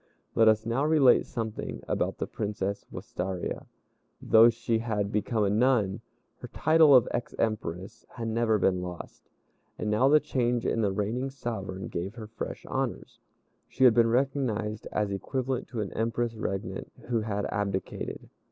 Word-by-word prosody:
Let 115 Hz, -, +4 dB
us 110 Hz, 0 st, +4 dB
now 115 Hz, +5 st, 0 dB
relate 150 Hz, -4 st, +5 dB
something 110 Hz, -2 st, -5 dB
about -, -, -1 dB
the -, -, -2 dB
Princess 100 Hz, -1 st, -4 dB
Wistaria. 90 Hz, 0 st, -4 dB, 0.5 s
Though 115 Hz, +1 st, +6 dB
she 115 Hz, -1 st, -1 dB
had 105 Hz, -3 st, -2 dB
become 105 Hz, +1 st, 0 dB
a 100 Hz, -, +2 dB
nun, 110 Hz, -3 st, +2 dB, 0.4 s
her -, -, -9 dB
title 155 Hz, -3 st, +5 dB
of 125 Hz, -, +6 dB
ex 120 Hz, -, -3 dB
Empress 110 Hz, -1 st, -3 dB
had 115 Hz, -2 st, -4 dB
never 110 Hz, -1 st, +2 dB
been 90 Hz, -2 st, +1 dB
lost; 90 Hz, -1 st, -9 dB, 0.5 s
and 105 Hz, -, -2 dB
now 110 Hz, +5 st, +4 dB
the 150 Hz, +1 st, +6 dB
change 125 Hz, -5 st, -1 dB
in 115 Hz, -, +1 dB
the 100 Hz, -2 st, +1 dB
reigning 110 Hz, +7 st, -2 dB
sovereign 100 Hz, -8 st, -5 dB
gave 95 Hz, +5 st, -4 dB
her 115 Hz, -3 st, -7 dB
fresh 110 Hz, +2 st, -7 dB
honors. -, -, -4 dB, 0.5 s
She 130 Hz, -, -1 dB
had 125 Hz, -3 st, +8 dB
been 115 Hz, 0 st, +4 dB
recognized 120 Hz, -4 st, -1 dB
as 105 Hz, -1 st, -1 dB
equivalent 130 Hz, +5 st, -2 dB
to 115 Hz, -4 st, -4 dB
an 100 Hz, -, -5 dB
Empress 115 Hz, +1 st, -1 dB
regnant 95 Hz, -3 st, -4 dB, 0.2 s
who 115 Hz, -2 st, +1 dB
had 105 Hz, -2 st, -2 dB
abdicated. 100 Hz, -2 st, -3 dB
110 Hz, 160 wpm, -28 LUFS, 100-120 Hz, 0.5 s, had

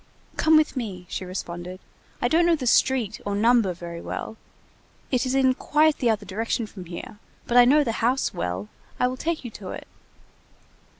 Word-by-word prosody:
"Come 315 Hz, 0 st, +5 dB
with 310 Hz, -1 st, +2 dB
me," 200 Hz, -8 st, -5 dB
she 185 Hz, -, -4 dB
responded. 180 Hz, 0 st, -6 dB, 0.4 s
"I -, -, +4 dB
don't 335 Hz, +6 st, +3 dB
know 340 Hz, -, +4 dB
the 280 Hz, -5 st, -5 dB
street 240 Hz, -3 st, +2 dB
or 200 Hz, 0 st, -2 dB
number 225 Hz, -1 st, +3 dB
very 170 Hz, -1 st, -7 dB
well; -, -, -5 dB, 0.8 s
it 255 Hz, 0 st, +1 dB
is 255 Hz, -, 0 dB
in 260 Hz, -1 st, +4 dB
quite 305 Hz, +3 st, +2 dB
the 245 Hz, -, +2 dB
other 215 Hz, -2 st, 0 dB
direction 225 Hz, +4 st, -2 dB
from 195 Hz, -3 st, -10 dB
here, 175 Hz, +4 st, -8 dB, 0.3 s
but 240 Hz, -, -2 dB
I 245 Hz, 0 st, +9 dB
know 295 Hz, +4 st, +5 dB
the 235 Hz, -, -1 dB
house 250 Hz, +4 st, +1 dB
well, 90 Hz, +3 st, -3 dB, 0.3 s
I -, -, +3 dB
will 250 Hz, +1 st, -1 dB
take 320 Hz, +1 st, -3 dB
you 240 Hz, -, -5 dB
to 195 Hz, -3 st, -9 dB
it." -, -, -7 dB
230 Hz, 190 wpm, -25 LUFS, 185-265 Hz, 0.8 s, I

